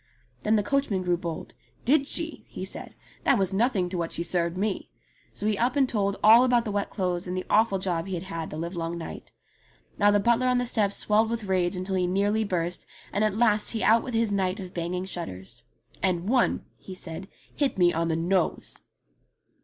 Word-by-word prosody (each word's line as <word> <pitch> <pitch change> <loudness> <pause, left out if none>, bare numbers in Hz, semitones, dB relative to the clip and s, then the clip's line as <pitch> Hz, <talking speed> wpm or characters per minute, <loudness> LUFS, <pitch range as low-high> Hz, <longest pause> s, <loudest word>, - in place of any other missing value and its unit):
Then 215 +1 +2
the 210 - +2
coachman 220 -6 0
grew 175 -1 +2
bold. 170 -2 -6 0.3
"Did 275 +2 +3
she?" 330 +1 -1
he - - -6
said. - - -8 0.3
"That 275 - +4
was 195 -1 +1
nothing 200 -3 +2
to 180 -1 -3
what 165 -1 -2
she 170 - -3
served 170 0 0
me." 200 +1 -2 0.5
So - - -3
he 210 -2 +1
up 245 +2 +1
and 275 -2 +3
told 200 -4 0
all 225 +3 +8
about 245 -2 +3
the 210 - -2
wet 205 0 -1
clothes 180 -2 -2
and 180 +1 -3
the 185 - -3
awful 215 -2 +4
job 180 -2 -2
he 190 - -3
had 170 - -4
had 165 -4 -5
the 155 - -6
livelong 170 0 -3
night. 165 - -8 0.7
Now 205 0 +5
the 205 0 +4
butler 235 +4 +2
on 250 0 +3
the 245 - 0
steps 210 -4 +1
swelled 215 +1 +2
with 230 -1 -2
rage 185 -2 0
until 185 +1 -3
he 180 -1 +1
nearly 205 +4 +1
burst, 175 -3 -2 0.3
and 205 - +1
at 215 -2 +1
last 215 -2 +3
he 225 - -1
out 225 +1 +5
with 250 - -5
his 225 -2 +2
night 190 0 0
of 185 -2 -8
banging 180 +2 -3
shutters. 120 - -6 0.4
"And 180 -1 0
one," 250 +2 +2
he 190 - -10
said, 180 +1 -7 0.3
"hit 285 -7 0
me 175 -1 +4
on 165 +1 0
the 160 - 0
nose." 175 +2 -1
195 Hz, 215 wpm, -27 LUFS, 175-220 Hz, 0.7 s, all